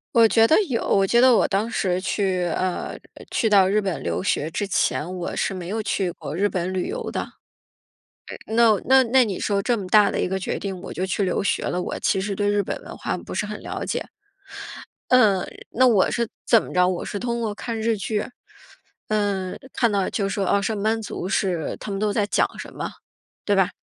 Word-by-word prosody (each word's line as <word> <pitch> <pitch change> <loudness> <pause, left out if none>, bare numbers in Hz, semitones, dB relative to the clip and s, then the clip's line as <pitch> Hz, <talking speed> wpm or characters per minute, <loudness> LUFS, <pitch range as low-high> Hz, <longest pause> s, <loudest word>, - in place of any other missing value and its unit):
我 230 -1 +7
觉 225 +1 +5
得 315 - +5
有， 235 -3 -1
我 195 -1 +3
觉 235 +4 +4
得 255 -1 +6
我 - - +3
当 205 +3 0
时 185 -5 0
去， 190 -1 0
呃 175 +1 -2 0.2
呃， - - -12
去 225 - +1
到 195 -3 +6
日 210 +2 +2
本 190 -4 -3
留 - - -1
学 185 -5 0
之 205 +4 -2
前， 180 -3 0
我 175 - -4
是 195 - -1
没 180 -2 -6
有 220 +2 -2
去 195 -3 -1
过 150 - -7
日 200 +2 +3
本 185 -2 -2
旅 185 -1 -1
游 470 +3 -4
的。 - - -3 1.2
那 225 -2 +4
那 265 0 +6
那 255 +1 +4
你 200 -5 -4
说 200 -1 +1
这 240 +4 +1
么 205 - -5
大 210 +1 +5
的 - - -1
一 - - 0
个 190 - -1
决 190 - -3
定， 195 -2 -5
我 - - -7
就 185 - -2
去 190 +2 0
留 185 - 0
学 200 - 0
了， 180 - -1
我 - - -4
其 195 - +1
实 200 0 -3
对 205 -1 0
日 205 0 +2
本 - - -4
文 - - -9
化 - - -3
不 - - -8
是 - - -1
很 - - -6
了 - - -5
解。 - - -3 1.0
嗯， 210 -7 +4 0.2
那 255 - +3
我 220 -7 +4
是 235 -1 -1 0.2
怎 230 - +6
么 - - -9
着， 180 0 +4
我 180 -2 -3
是 200 - -4
通 235 0 -2
过 220 -3 -2
看 225 +2 -5
日 225 +1 +1
剧， 210 +1 -2 0.8
嗯， 200 -3 -1 0.2
看 235 -3 +2
到 200 -2 0
就 200 - -1
说， 195 -1 -1
呃， 200 - +2
上 210 0 -2
班 220 +2 +1
族 205 -3 -5
是 180 -6 -1
他 210 - -6
们 195 - -3
都 210 0 +1
在 205 0 +1
讲 205 - +2
什 - - -8
么， - - -4 0.6
对 205 - +2
吧？ 190 -2 +3
200 Hz, 245 characters per minute, -23 LUFS, 190-225 Hz, 1.2 s, 我